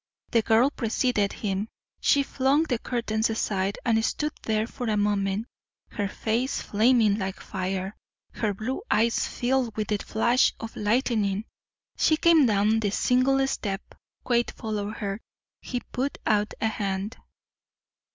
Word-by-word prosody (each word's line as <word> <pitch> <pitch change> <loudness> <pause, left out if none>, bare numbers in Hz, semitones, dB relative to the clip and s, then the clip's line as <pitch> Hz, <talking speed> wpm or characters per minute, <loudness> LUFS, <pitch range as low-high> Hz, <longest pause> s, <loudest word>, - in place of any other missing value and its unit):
The 230 - +4
girl 225 +5 +4
preceded 230 -4 0
him. 205 +1 -3 0.3
She 280 - +3
flung 275 +3 +2
the 250 -8 -1
curtains 230 -3 -1
aside 200 -3 -1
and 225 -2 +3
stood 300 +5 -1
there 220 0 0
for 245 +1 -6
a 210 - +1
moment, 205 0 0 0.5
her 205 -1 -2
face 230 +6 -1
flaming 220 -1 +3
like 190 -1 -3
fire, 190 +2 -3 0.4
her 215 -2 -1
blue 220 - -3
eyes 230 +2 +2
filled 245 -3 -1
with 215 -2 -2
the 210 -1 +1
flash 235 +5 +2
of 225 - -7
lightning. 210 -2 +1 0.5
She 310 - +3
came 320 -5 +5
down 210 +1 +3
the 210 -2 0
single 255 +6 +2
step. 200 -6 -4 0.3
Quade 240 -1 +1
followed 215 -2 -4
her. 200 0 -3 0.4
He 245 -1 -4
put 270 +3 -2
out 210 -1 +1
a 220 - +1
hand. 200 0 -3
220 Hz, 140 wpm, -26 LUFS, 205-245 Hz, 0.5 s, came